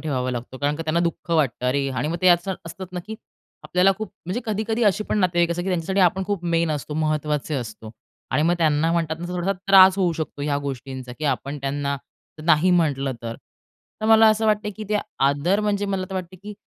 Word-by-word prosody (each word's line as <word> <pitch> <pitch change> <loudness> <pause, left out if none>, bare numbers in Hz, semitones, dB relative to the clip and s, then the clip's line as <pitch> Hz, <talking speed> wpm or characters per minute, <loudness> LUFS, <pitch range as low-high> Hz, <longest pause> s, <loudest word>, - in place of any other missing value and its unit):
ठेवावा 130 -5 -2
लागतो 125 +1 -6
कारण 145 +1 0
का 165 - -4
त्यांना 160 +1 0
दुःख 170 0 -3
वाटतं. 140 -7 +1
अरे, 135 +2 +1
आणि 130 +3 -2
मग 165 - -2
ते 185 - +6
आजकाल 175 +2 +3
असतात 190 +3 -7
ना, 180 - -4
की 220 - -6 0.5
आपल्याला 180 +2 +3
खूप 215 - -5 0.2
म्हणजे 185 +7 -2
कधी-कधी 220 +2 -1
अशी 210 +1 +2
पण 215 - -1
नातेवाईक 175 -3 +2
त्यांच्यासाठी 185 +1 -1
आपण 185 +1 +3
खूप 200 -4 -2
मेन 170 -1 +1
असतो, 150 0 -4
महत्त्वाचे 150 -1 -1
असतो 110 -4 -6 0.4
आणि 150 - +2
मग 170 +2 +3
त्यांना 160 0 +2
म्हणतात 165 -2 0
ना, 175 - -4
थोडासा 180 +2 -1
त्रास 190 -1 +8
होऊ 180 -3 +2
शकतो 155 -3 -5
ह्या 145 -1 0
गोष्टींचा, 130 -1 -7
की 155 - -5
आपण 140 +1 -1
त्यांना 140 +1 -2 0.5
नाही 165 +2 +4
म्हटलं 145 -6 +1
तर. 115 -1 -4 0.7
तर 215 - -1
मला 220 0 +7
असं 220 +1 +1
वाटतं 210 -1 +1
की 215 - -6
ते 210 0 +1 0.3
आदर 160 +9 +1
म्हणजे, 205 -1 0
मला 195 -1 -1
तर - - -5
वाटतं, 185 0 -5
की 210 0 -8
170 Hz, 210 wpm, -23 LUFS, 145-190 Hz, 0.7 s, त्रास